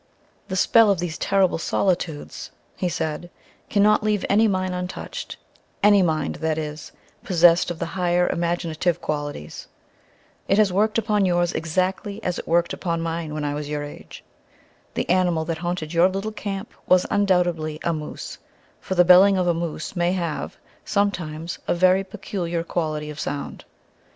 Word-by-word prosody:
"The 190 Hz, -, -4 dB
spell 225 Hz, +3 st, +5 dB
of 200 Hz, -, +3 dB
these 170 Hz, -2 st, -4 dB
terrible 195 Hz, -4 st, +2 dB
solitudes," 170 Hz, -4 st, -2 dB, 0.3 s
he 180 Hz, -, -1 dB
said, 160 Hz, 0 st, -3 dB, 0.4 s
"cannot 210 Hz, 0 st, +4 dB
leave 210 Hz, -2 st, 0 dB
any 220 Hz, +3 st, +5 dB
mind 185 Hz, -2 st, -1 dB
untouched, 180 Hz, +1 st, -6 dB, 0.5 s
any 205 Hz, -1 st, +6 dB
mind, 155 Hz, -4 st, 0 dB
that 160 Hz, -1 st, -1 dB
is, 150 Hz, -1 st, -5 dB, 0.3 s
possessed 175 Hz, -1 st, +4 dB
of 175 Hz, -, -4 dB
the 170 Hz, -, -3 dB
higher 180 Hz, -1 st, +2 dB
imaginative 170 Hz, 0 st, -1 dB
qualities. 145 Hz, -, -5 dB, 0.8 s
It 195 Hz, -, +3 dB
has 210 Hz, -4 st, +4 dB
worked 215 Hz, +3 st, +2 dB
upon 210 Hz, -3 st, +2 dB
yours 175 Hz, -1 st, +1 dB
exactly 185 Hz, +5 st, -1 dB
as 180 Hz, -1 st, -2 dB
it -, -, -8 dB
worked 170 Hz, +1 st, +2 dB
upon 170 Hz, -2 st, -2 dB
my 165 Hz, 0 st, -2 dB
own 150 Hz, -1 st, -6 dB
when 155 Hz, -, -3 dB
I 145 Hz, -, -1 dB
was 145 Hz, 0 st, -5 dB
your 150 Hz, -1 st, -2 dB
age. 145 Hz, -, -10 dB, 0.7 s
The -, -, -1 dB
animal 175 Hz, -3 st, +2 dB
that 160 Hz, 0 st, -3 dB
haunted 175 Hz, -2 st, -3 dB
your 170 Hz, +2 st, +5 dB
little 195 Hz, +3 st, -3 dB
camp 200 Hz, -1 st, -5 dB
was 185 Hz, 0 st, +4 dB
undoubtedly 175 Hz, -6 st, +1 dB
a 170 Hz, -, +1 dB
moose, 155 Hz, -1 st, -7 dB, 0.4 s
for 190 Hz, -, -4 dB
the 180 Hz, 0 st, +5 dB
'belling' 190 Hz, +2 st, +7 dB
of 180 Hz, -, +1 dB
a 175 Hz, -, +3 dB
moose 165 Hz, 0 st, -4 dB
may 175 Hz, 0 st, +1 dB
have, 170 Hz, -5 st, -3 dB, 0.3 s
sometimes, 170 Hz, -5 st, -2 dB
a -, -, +2 dB
very 185 Hz, +2 st, +4 dB
peculiar 185 Hz, -4 st, -4 dB
quality 155 Hz, -3 st, -3 dB
of 150 Hz, -, -10 dB
sound. 145 Hz, -, -5 dB
175 Hz, 165 wpm, -23 LUFS, 160-190 Hz, 0.8 s, belling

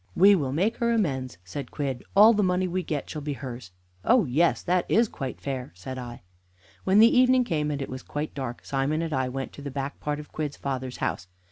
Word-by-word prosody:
"We 200 Hz, +3 st, +7 dB
will 145 Hz, -9 st, +1 dB
make 195 Hz, -, +1 dB
her 235 Hz, 0 st, +1 dB
amends," 135 Hz, -, -1 dB
said 120 Hz, +8 st, -6 dB
Quidd, 135 Hz, -4 st, -3 dB
"all 215 Hz, +3 st, +8 dB
the 210 Hz, -, +2 dB
money 185 Hz, -1 st, +1 dB
we 185 Hz, +1 st, -1 dB
get 150 Hz, -4 st, -3 dB
shall 155 Hz, -, -5 dB
be 145 Hz, 0 st, -3 dB
hers." 125 Hz, -6 st, -7 dB, 0.3 s
"Oh 225 Hz, -, +4 dB
yes; 155 Hz, +6 st, +2 dB
that 180 Hz, 0 st, +1 dB
is 230 Hz, +2 st, +4 dB
quite 135 Hz, -9 st, -6 dB
fair," 130 Hz, -3 st, -4 dB
said 130 Hz, +9 st, -7 dB
I. 120 Hz, -4 st, -8 dB, 0.6 s
When 190 Hz, +1 st, +4 dB
the 230 Hz, +4 st, +7 dB
evening 255 Hz, 0 st, +5 dB
came 155 Hz, -9 st, -1 dB
and 140 Hz, -2 st, -2 dB
it -, -, -6 dB
was 130 Hz, 0 st, -6 dB
quite 150 Hz, +1 st, -4 dB
dark, 130 Hz, -4 st, -5 dB
Simon 145 Hz, +4 st, 0 dB
and 160 Hz, -2 st, -3 dB
I 130 Hz, -1 st, 0 dB
went 135 Hz, +1 st, -5 dB
to -, -, -10 dB
the 140 Hz, -, -5 dB
back 140 Hz, +1 st, -4 dB
part 150 Hz, 0 st, -2 dB
of 150 Hz, -, -10 dB
Quidd's 150 Hz, -2 st, -4 dB
father's 130 Hz, -2 st, -4 dB
house. 90 Hz, -, -2 dB
145 Hz, 230 wpm, -26 LUFS, 130-185 Hz, 0.6 s, all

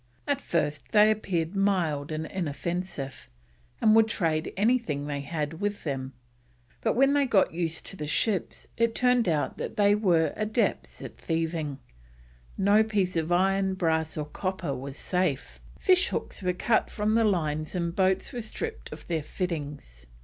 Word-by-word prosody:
At 285 Hz, -2 st, 0 dB
first 150 Hz, -3 st, -2 dB
they 215 Hz, 0 st, +7 dB
appeared 185 Hz, -5 st, -1 dB
mild 170 Hz, -7 st, +1 dB
and 155 Hz, +1 st, -3 dB
inoffensive, 170 Hz, -3 st, -4 dB, 0.5 s
and 215 Hz, 0 st, +5 dB
would 225 Hz, 0 st, +6 dB
trade 165 Hz, -7 st, 0 dB
anything 205 Hz, -, +1 dB
they 145 Hz, -1 st, -3 dB
had 155 Hz, +2 st, -4 dB
with 205 Hz, 0 st, -2 dB
them; 135 Hz, -3 st, -3 dB, 0.7 s
but -, -, +1 dB
when 270 Hz, +3 st, +4 dB
they 285 Hz, -1 st, +3 dB
got 200 Hz, -8 st, +3 dB
used 165 Hz, -1 st, -2 dB
to -, -, -7 dB
the 150 Hz, -5 st, -5 dB
ships 195 Hz, +5 st, -1 dB
it 230 Hz, -1 st, +2 dB
turned 250 Hz, -4 st, +3 dB
out 150 Hz, -3 st, -1 dB
that -, -, -5 dB
they 205 Hz, -1 st, +5 dB
were 175 Hz, -7 st, +2 dB
adepts 215 Hz, -1 st, -1 dB
at -, -, -9 dB
thieving; 160 Hz, -3 st, -2 dB, 0.8 s
no 200 Hz, +3 st, +5 dB
piece 200 Hz, -5 st, 0 dB
of 165 Hz, +1 st, -1 dB
iron, 190 Hz, +1 st, +2 dB
brass, 160 Hz, -3 st, 0 dB
or 150 Hz, -, -2 dB
copper 180 Hz, -1 st, -3 dB
was 135 Hz, +2 st, -6 dB
safe. 180 Hz, -7 st, -1 dB, 0.2 s
Fish 370 Hz, -1 st, +4 dB
hooks -, -, -4 dB
were 180 Hz, -1 st, +1 dB
cut 220 Hz, +5 st, +1 dB
from 210 Hz, 0 st, 0 dB
the 230 Hz, 0 st, +4 dB
lines 155 Hz, -6 st, 0 dB
and 170 Hz, -1 st, -2 dB
boats 190 Hz, 0 st, +1 dB
were 245 Hz, -, -3 dB
stripped 445 Hz, -, -5 dB
of -, -, -9 dB
their 165 Hz, -2 st, -1 dB
fittings. 145 Hz, -, -5 dB
180 Hz, 165 wpm, -27 LUFS, 155-210 Hz, 0.8 s, they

